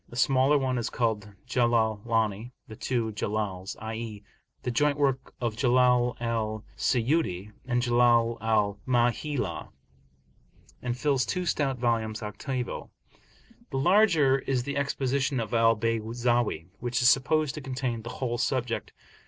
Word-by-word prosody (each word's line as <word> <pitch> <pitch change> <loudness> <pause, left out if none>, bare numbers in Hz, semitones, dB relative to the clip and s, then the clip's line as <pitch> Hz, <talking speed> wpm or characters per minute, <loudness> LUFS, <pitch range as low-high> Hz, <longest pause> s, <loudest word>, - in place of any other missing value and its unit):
The - - -11
smaller 135 +2 +4
one 130 -2 0
is 115 - -2
called 110 -4 -1 0.2
Jalalani 115 -2 +1
("the 110 - -9
two 115 -1 -1
Jalals," 100 -2 -3
i.e. 110 -1 -6 0.4
the 125 - -1
joint 145 +4 +2
work 135 -2 0
of 115 -3 -2
Jalal 125 0 +3
al 110 -2 -2
Siyuti 115 - 0
and 120 -1 0
Jalal 120 -1 +3
al 105 -2 +1
Mahalli), 125 +3 0 1.1
and 120 0 -3
fills 135 -1 +1
two 180 -1 -2
stout 140 -6 0
volumes 115 -2 -1
octavo. 125 +4 -4 0.8
The 135 - -3
larger 160 -4 +4
is 130 -2 -1
the 140 +2 -4
Exposition 140 -1 0
of 115 0 -4
Al 115 0 +4
Bayzawi, 115 -3 0
which 120 0 -1
is - - +6
supposed 150 +2 +2
to 150 - -6
contain 130 -3 -3
the 115 - -7
whole 120 -1 -3
subject. 125 -3 -1
120 Hz, 135 wpm, -27 LUFS, 115-130 Hz, 1.1 s, is